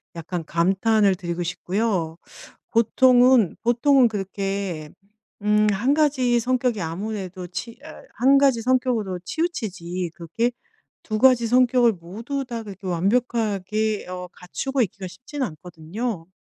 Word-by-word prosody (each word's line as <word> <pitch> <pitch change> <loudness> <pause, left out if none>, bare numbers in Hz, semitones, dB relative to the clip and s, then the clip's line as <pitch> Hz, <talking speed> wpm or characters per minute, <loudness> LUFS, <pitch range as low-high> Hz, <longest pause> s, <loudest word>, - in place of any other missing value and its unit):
약간 165 0 -5
감탄을 195 +4 +2
드리고 175 -1 -4
싶고요. 180 -1 -2 0.5
보통은 245 -1 +4
보통은 245 +2 +4
그렇게 195 -5 -4 0.5
음 210 0 +3
1 245 +9 +1
가지 260 -6 +2
성격이 245 -3 0
아무래도 185 +1 -5
치 225 +6 -7
어 - - -11 0.2
1 270 +4 +5
가지 270 -4 +3
성격으로 240 -6 0
치우치지 190 - -3
그게 190 +8 -2 0.5
2 215 -1 -2
가지 245 -1 +5
성격을 245 -1 +4
모두 225 +11 -5
다 235 -2 -4
그렇게 195 -2 -10
완벽하게 215 +2 0
어 180 0 -6
갖추고 265 +8 -2
있기가 190 -1 -5
쉽진 270 +9 -8
않거든요. 175 - -5
215 Hz, 265 characters per minute, -23 LUFS, 180-245 Hz, 0.5 s, 1